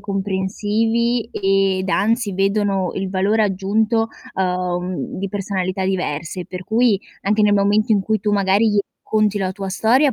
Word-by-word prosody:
comprensivi 210 +4 -1
ed 195 -1 +1
anzi 220 0 +1
vedono 195 -1 +1
il 190 -1 -3
valore 200 +4 +2
aggiunto, 215 +3 +1 0.2
uhm, 180 -1 -2
di 195 0 -3
personalità 190 -1 -2
diverse, 180 -1 -3
per 180 0 -7
cui 225 -2 +2 0.2
anche 210 +2 +1
nel 210 0 +4
momento 205 +3 +3
in 205 - +3
cui 215 +3 0
tu 210 +1 -1
magari 200 +2 +3
gli 205 - +1 0.2
racconti 215 -1 +1
la 190 -2 -1
tua 195 0 -5
storia, 250 +8 +3
200 Hz, 150 wpm, -20 LUFS, 190-215 Hz, 0.2 s, nel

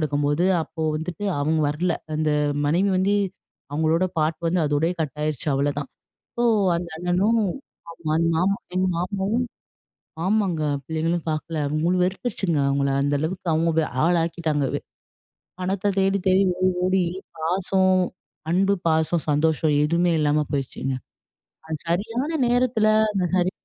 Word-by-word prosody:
எடுக்கும்போது, 145 +2 +1 0.2
அப்போ 160 0 -6
வந்துட்டு 165 +5 -5 0.2
அவங்க 155 +2 +1
வரல. 165 +4 0 0.2
அந்த 155 0 0 0.4
மனைவி 175 +7 +2
வந்து, 195 +2 +2 0.6
அவங்களோட 160 +4 +2
பார்ட் 155 +1 +1
வந்து 175 +1 +1
அதோடையயே 155 +4 +1
கட் 150 -3 -2
ஆயிருச்சு 155 -1 -2
அவ்வளதான். 140 0 -1 0.5
ஸோ, 240 - +1 0.3
அந்த 170 0 -4
அண்ணனும், 180 +7 +2 0.5
ஆமா. 165 -2 -5
அந்த 165 - +2
மாமா 190 +4 +2 0.2
எங்க 185 0 +2
மாமாவும் 200 +7 -1 0.8
ஆமாங்க 190 -5 +1 0.2
பிள்ளைங்களும் 165 +2 -1
பார்க்கல. 155 +1 -3
அவங்க 150 +2 -1
மு 170 - +3
வெறுத்துருச்சுங்க 185 -3 -1
அவங்கள. 140 0 +1
அந்த 145 +1 +1
அளவுக்கு 175 +3 -3
அவங்க 160 0 +2 0.2
ஆளாக்கிட்டாங்க 165 -3 +1
வே - - +1 0.8
பணத்தை 195 +2 -1
தேடி, 195 +1 +2
தேடி, 190 +1 +5 0.2
ஓடி, 185 0 +3
ஓடி, 185 0 +2 0.4
பாசம் 185 +3 +2 0.6
அன்பு, 195 +3 +3
பாசம், 160 +1 +1
சந்தோஷம் 155 +1 +2
எதுவுமே 170 +2 +2
இல்லாம 150 0 +2
போயிருச்சுங்க. 135 -1 -2 0.7
அது 160 -1 -4
சரியான 230 - -1 0.2
நேரத்தில, 245 -3 +2 0.3
அந்த 195 -3 0
ஹரி 180 0 +2
170 Hz, 130 wpm, -23 LUFS, 155-185 Hz, 0.8 s, தேடி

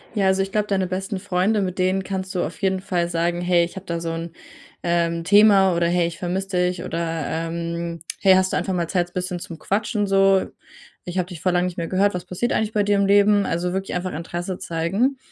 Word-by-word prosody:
Ja, 200 -2 +2
also, 190 0 +3
ich 195 - -7
glaube, 210 0 0
deine 195 -2 +1
besten 190 +2 -3
Freunde, 200 +2 +1
mit 185 -1 -3
denen 185 +1 +1
kannst 190 0 -4
du 180 - +1
auf - - -6
jeden 190 -1 +1
Fall 175 -2 -1
sagen: 170 +1 0
„Hey, 175 -1 +3
ich 170 - -11
habe 190 0 -8
da 170 -1 -2
so 165 0 -3
'n, 165 0 -5 0.5
ähm, 170 -1 0
Thema“, 195 -1 +6
oder: 170 0 +2
„Hey, 175 0 +2
ich 170 - -7
vermisse 190 +2 -2
dich“, 180 -1 0
oder, 165 - -3 0.5
ähm: 170 0 -4 0.2
„Hey, 190 -2 +6
hast 185 0 +2
du - - +2
einfach 190 - -1
mal 170 -2 -1
Zeit, 175 -1 -1
bisschen 180 0 -3
zum 170 -1 -8
Quatschen, 210 +4 -1
so? 195 -1 +4 0.6
Ich 180 +1 -5
habe 180 -1 0
dich 170 -4 -9
voll 185 - +2
lang 180 0 +2
nicht 180 -1 -4
mehr 170 -1 -2
gehört. 200 +2 +2
Was 180 -1 -5
passiert 195 +7 -2
eigentlich 220 0 0
bei 210 - +2
dir 205 0 +2
im 200 0 +2
Leben?“ 205 0 +4
Also, 175 +2 -1
wirklich 190 0 -3
einfach 180 +1 -3
Interesse 175 +3 -5
zeigen. 195 +12 0
185 Hz, 235 wpm, -22 LUFS, 175-195 Hz, 0.6 s, Thema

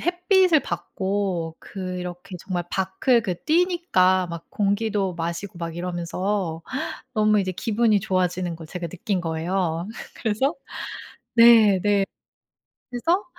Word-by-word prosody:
햇빛을 360 -1 +4
받고 180 -1 -2
그렇게 180 -1 -6
정말 180 -3 -3
밖을 195 +6 +2
그 180 -5 -2
뛰니까 315 - +3
막 170 0 -7
공기도 205 -2 0
마시고 170 +2 -4
막 165 -1 -5
이러면서 175 0 -2 0.5
너무 215 -1 +4
이제 185 -1 -2
기분이 215 +2 +2
좋아지는 180 -3 -1
걸 160 -1 -10
제가 170 +1 -5
느낀 185 +2 -2
거예요. 170 +1 -1 0.4
그래서 265 +9 +1 0.8
네 225 -4 +7
네. 205 -1 +3 0.9
그래서 330 +11 +1
190 Hz, 245 characters per minute, -24 LUFS, 175-220 Hz, 0.9 s, 네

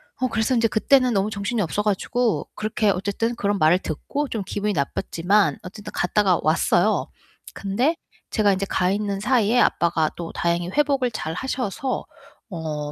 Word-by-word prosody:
어 255 - 0
그래서 225 +2 0
인제 230 -1 +3
그때는 255 +3 +3
너무 200 0 +1
정신이 210 +2 -2
없어 195 +3 -1
가지고 220 +3 0
그렇게 215 0 0
어쨌든 200 +5 -1
그런 205 -3 -1
말을 155 +3 +5
듣고 280 - -3
좀 220 -3 -3
기분이 205 +2 -2
나빴지만 175 +6 +1
어쨌든 205 +3 -9
갔다가 185 0 +2
왔어요. 155 +2 +2 0.5
근데 240 +12 0 0.4
제가 210 -3 +3
인제 190 +1 -1
가 180 -2 +1
있는 200 0 -1
사이에 235 +1 +2
아빠가 165 -5 +2
또 170 -1 -5
다행히 170 0 -1
회복을 275 0 +1
잘 160 -7 -4
하셔서 255 +4 -3 0.5
어 155 -4 -4
205 Hz, 350 characters per minute, -23 LUFS, 180-235 Hz, 0.5 s, 말을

